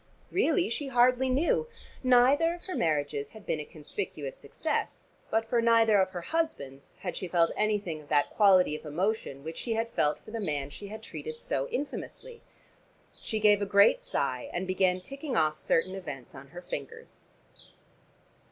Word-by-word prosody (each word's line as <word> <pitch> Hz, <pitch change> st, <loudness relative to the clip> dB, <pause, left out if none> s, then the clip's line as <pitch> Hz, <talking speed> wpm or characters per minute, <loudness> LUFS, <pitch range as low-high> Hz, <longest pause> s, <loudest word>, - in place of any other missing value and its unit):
Really 380 Hz, -2 st, +2 dB
she 275 Hz, +5 st, -2 dB
hardly 255 Hz, 0 st, +3 dB
knew. 320 Hz, -, +2 dB, 0.3 s
Neither 265 Hz, +7 st, +4 dB
of 350 Hz, -, -14 dB
her 370 Hz, -, -5 dB
marriages 145 Hz, -, -1 dB
had 215 Hz, -, -14 dB
been 155 Hz, -, -1 dB
a -, -, -3 dB
conspicuous 415 Hz, -, -6 dB
success, -, -, -3 dB, 0.2 s
but 225 Hz, 0 st, +1 dB
for 235 Hz, +1 st, +1 dB
neither 225 Hz, -3 st, +5 dB
of 190 Hz, -, +1 dB
her 180 Hz, -2 st, -6 dB
husbands 140 Hz, -, -3 dB
had 180 Hz, -, -4 dB
she 185 Hz, -, -3 dB
felt 170 Hz, -1 st, +3 dB
anything 205 Hz, -7 st, -1 dB
of 145 Hz, -, -18 dB
that 145 Hz, -1 st, +2 dB
quality 185 Hz, -6 st, +5 dB
of -, -, -8 dB
emotion 160 Hz, -3 st, -2 dB
which 160 Hz, +1 st, -6 dB
she 235 Hz, -, -1 dB
had 225 Hz, +1 st, -1 dB
felt 150 Hz, -8 st, +1 dB
for -, -, -13 dB
the 230 Hz, -, -4 dB
man 145 Hz, -8 st, -2 dB
she 200 Hz, -, -8 dB
had 215 Hz, +2 st, -8 dB
treated 155 Hz, -4 st, -6 dB
so 135 Hz, -2 st, -2 dB
infamously. 460 Hz, -, -5 dB, 0.8 s
She 220 Hz, -, -2 dB
gave 210 Hz, -1 st, +5 dB
a 200 Hz, -, -1 dB
great 200 Hz, 0 st, +5 dB
sigh 125 Hz, -3 st, -2 dB
and 180 Hz, +2 st, -2 dB
began 185 Hz, 0 st, +1 dB
ticking 275 Hz, +4 st, -4 dB
off 155 Hz, 0 st, +2 dB
certain 185 Hz, +3 st, +1 dB
events 145 Hz, -10 st, -7 dB
on 130 Hz, +1 st, -11 dB
her 175 Hz, +5 st, -10 dB
fingers. 140 Hz, -5 st, -7 dB
195 Hz, 175 wpm, -29 LUFS, 155-240 Hz, 0.8 s, neither